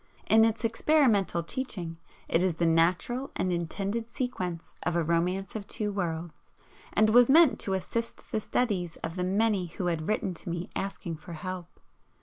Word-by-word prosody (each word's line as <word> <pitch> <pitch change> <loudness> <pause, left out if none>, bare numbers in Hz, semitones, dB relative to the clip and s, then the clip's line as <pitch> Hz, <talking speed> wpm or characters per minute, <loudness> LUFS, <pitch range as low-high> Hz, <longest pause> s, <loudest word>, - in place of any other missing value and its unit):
In 220 0 +6
its 225 0 +1
experimental 230 - +3
teaching 180 -7 -5 0.3
it 170 - +2
is 185 -3 +1
the 170 - +1
natural 175 +11 +2
and 185 - 0
intended 200 +7 -2
sequence 185 -9 -4
of 175 - -1
"A 170 - +2
Romance 180 +5 0
of 205 -2 -5
Two 210 -1 -2
Worlds," 170 -3 -4 0.4
and 215 +1 +4
was 245 +2 +7
meant 315 0 +6
to 195 - -1
assist 230 +5 -3
the - - +1
studies 200 -7 -1
of 165 +1 -3
the 180 - -1
many 195 0 +1
who 175 +2 -5
had 165 -3 -1
written 205 -3 0
to 175 - -8
me 170 +1 -4
asking 180 -4 -4
for 170 +3 -10
help. 180 +2 -7
185 Hz, 170 wpm, -29 LUFS, 170-220 Hz, 0.4 s, was